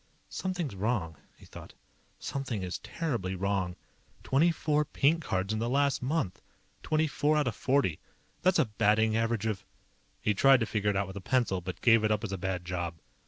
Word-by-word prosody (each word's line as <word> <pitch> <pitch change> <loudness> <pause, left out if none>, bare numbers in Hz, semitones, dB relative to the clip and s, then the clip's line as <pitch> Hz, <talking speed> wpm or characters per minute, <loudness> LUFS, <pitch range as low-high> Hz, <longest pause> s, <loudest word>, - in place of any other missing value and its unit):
Something's 180 - -3
wrong, 95 - -1 0.2
he - - -16
thought. - - -12 0.4
_Something 130 -8 -3
is 90 -1 -4
terribly 120 - -3
wrong. 95 -1 -1 0.5
Twenty 155 +6 +3
four 150 -2 +1
pink 155 +3 +1
cards 95 +2 -1
in 110 - -1
the 115 +1 -1
last 140 +1 +2
month. 130 - -1 0.4
Twenty 155 0 +1
four 150 0 +1
out 150 -3 +1
of 115 - -1
forty. 130 - +1 0.4
That's 185 0 +3
a - - +4
batting 110 0 +2
average 115 -1 0
of_ 105 -3 -1 0.6
He 105 +1 +1
tried 135 +5 +5
to - - +2
figure 105 -2 0
it 100 - 0
out 100 +1 +1
with 95 +1 -8
a - - -6
pencil, 115 -4 +1
but 90 +1 -6
gave 115 -2 +5
it 110 - +2
up 105 +1 0
as 110 - -3
a 95 - -3
bad 95 -1 -3
job. 85 -1 -3
110 Hz, 195 wpm, -30 LUFS, 95-140 Hz, 0.6 s, tried